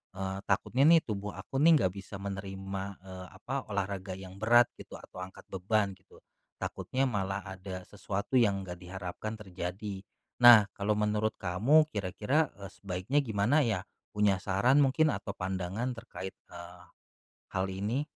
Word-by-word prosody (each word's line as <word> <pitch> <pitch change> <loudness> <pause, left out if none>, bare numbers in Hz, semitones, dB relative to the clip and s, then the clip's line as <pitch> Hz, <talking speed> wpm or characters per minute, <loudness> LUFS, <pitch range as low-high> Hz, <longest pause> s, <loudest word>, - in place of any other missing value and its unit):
eee, 95 0 -3
takutnya 135 +3 +2
nih 165 -1 +7
tubuh 105 -2 -4
aku 135 - -6
nih 165 +1 +7
nggak 90 0 +1
bisa 100 +1 -8
menerima, 95 0 -5 0.2
eee, 95 -1 -9
apa 130 +8 -4
olahraga 95 -1 -2
yang 95 0 -10
berat 120 +2 +6
gitu - - -10
atau 90 - -9
angkat 95 - -11
beban 100 +1 0
gitu, 95 - -20 0.4
takutnya 135 +1 -1
malah 100 -2 -2 0.2
ada 95 0 -6
sesuatu 100 +4 -4
yang 100 -5 +3
nggak 90 -1 -7
diharapkan 95 +4 -6
terjadi. 95 +1 -5 0.4
Nah 115 -4 +10
kalau 100 +2 +1
menurut 105 +1 +1
kamu 115 - +4
kira-kira, 105 - 0
eee, 100 - -7
sebaiknya 95 +9 -1
gimana 115 +8 +2
ya 100 -4 -1 0.3
punya 105 -2 +3
saran 120 +9 +3
mungkin 155 +4 +3
atau 100 - -4
pandangan 95 +7 -2
terkait, 95 -4 -7 0.2
eee, 90 +1 -10 0.7
hal 95 0 +1
ini? 105 +9 -1
100 Hz, 150 wpm, -31 LUFS, 95-110 Hz, 0.7 s, Nah